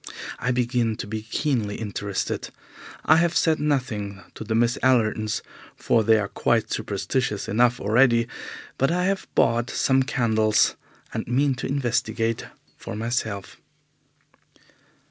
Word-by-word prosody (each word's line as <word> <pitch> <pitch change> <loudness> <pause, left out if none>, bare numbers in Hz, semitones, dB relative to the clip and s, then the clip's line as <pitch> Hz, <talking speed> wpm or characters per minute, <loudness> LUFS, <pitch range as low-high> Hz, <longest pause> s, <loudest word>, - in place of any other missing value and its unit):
I 125 - -1
begin 120 -2 +1
to - - -5
be 110 +1 -4
keenly 110 -2 -1
interested. 100 -2 -3 0.6
I 155 - +6
have 170 0 +2
said 160 -2 +2
nothing 120 -9 -1
to - - -7
the 110 0 -2
Miss 120 +1 +2
Allertons, 110 -4 +1 0.3
for 115 -2 +2
they 110 +1 +5
are 105 -2 -1
quite 115 +2 0
superstitious 105 +1 -2
enough 120 +2 +2
already, 115 +2 +3 0.5
but 135 - +3
I 180 +2 +1
have 195 0 -1
bought 120 +1 +2
some 130 0 +2
candles, 110 -4 +2 0.4
and 110 - -3
mean 135 +3 +2
to 125 - -4
investigate 120 -4 -1 0.3
for - - -7
myself. 110 -3 -3
115 Hz, 130 wpm, -24 LUFS, 110-130 Hz, 0.6 s, I